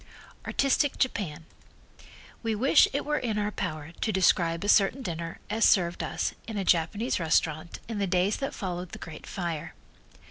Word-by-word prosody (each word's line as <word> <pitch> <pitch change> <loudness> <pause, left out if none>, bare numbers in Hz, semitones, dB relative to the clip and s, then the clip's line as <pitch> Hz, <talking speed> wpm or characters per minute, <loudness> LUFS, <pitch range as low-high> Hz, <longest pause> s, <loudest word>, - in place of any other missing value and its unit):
Artistic 275 +1 +2
Japan 170 - -1 1.0
We 225 -2 -1
wish 265 +8 +5
it 280 - -2
were 300 0 0
in 225 -4 -2
our 210 0 0
power 155 -6 -4
to 220 - +1
describe 175 -3 +2
a - - -2
certain 215 +6 +4
dinner 165 -3 -4
as 220 +2 0
served 175 -3 +4
us - - -2
in 220 -2 -4
a 195 - -1
Japanese 185 +9 +1
restaurant 160 0 0
in 225 -2 -4
the 200 - 0
days 185 +3 +2
that 275 - -4
followed 180 -2 -5
the - - -5
great 160 -2 -9
fire. 165 -4 -4
190 Hz, 170 wpm, -28 LUFS, 165-220 Hz, 1.0 s, wish